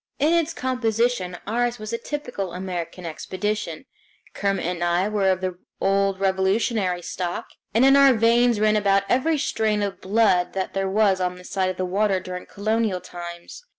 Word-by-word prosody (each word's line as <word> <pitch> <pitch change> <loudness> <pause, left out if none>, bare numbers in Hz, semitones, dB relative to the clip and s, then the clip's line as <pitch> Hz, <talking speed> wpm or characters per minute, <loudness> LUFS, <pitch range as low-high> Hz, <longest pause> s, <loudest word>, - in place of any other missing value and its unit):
In 305 +4 +3
its 335 -1 +2
composition 235 - -1
ours 240 +2 0
was 215 +1 -7
a - - 0
typical 245 -11 -5
American 180 -1 -5
expedition. 185 - -4 0.5
Kermit 195 -3 -1
and 175 0 -2
I 175 +3 +2
were 205 -2 +1
of 185 -1 +1
the 185 -1 -3 0.2
old 195 0 +1
Revolutionary 190 -1 +1
stock, 175 0 -4 0.2
and 230 +5 +4
in 270 0 +7
our 275 -1 +7
veins 230 0 +3
ran 215 0 +3
about 200 -1 +3
every 305 +5 +2
strain 215 -6 0
of 200 -1 -4
blood 195 -3 +2
that 190 -1 -3
there 195 0 -1
was 195 -2 +2
on 180 0 -1
this 180 0 -12
side 190 -1 +1
of 185 - -4
the 185 - -1
water 195 +1 +1
during 180 0 -7
colonial 215 -2 -1
times. 175 - -9
195 Hz, 175 wpm, -23 LUFS, 185-230 Hz, 0.5 s, in